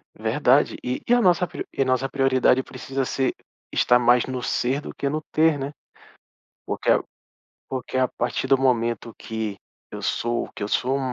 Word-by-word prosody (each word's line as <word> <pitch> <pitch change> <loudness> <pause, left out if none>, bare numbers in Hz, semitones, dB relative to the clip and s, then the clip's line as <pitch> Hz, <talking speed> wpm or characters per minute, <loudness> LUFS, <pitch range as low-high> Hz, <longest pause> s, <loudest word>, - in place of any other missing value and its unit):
Verdade. - - +2
E 125 +1 -2
e 240 - +4
a 245 - +5
nossa 180 -3 +4
pri - - -6
e - - -2
a - - +3
nossa 130 +1 +1
prioridade 130 -1 +3
precisa 135 0 -4
ser 130 +1 0 0.4
estar 125 0 +4
mais 120 0 +4
no 130 -1 -4
ser 130 +3 0
do - - -8
que 140 - -2
no 155 +2 -2
ter, 160 -1 +3
né. 135 +1 -4 1.0
Porque - - -1 0.8
porque 130 0 -4
a 130 - +4
partir 120 - -2
do 135 - +4
momento 120 -3 0
que 110 -2 -4 0.3
eu - - -7
sou 120 +1 -1
que - - -7
eu 100 - -2
sou, 130 +5 +1
130 Hz, 180 wpm, -24 LUFS, 120-135 Hz, 1.0 s, a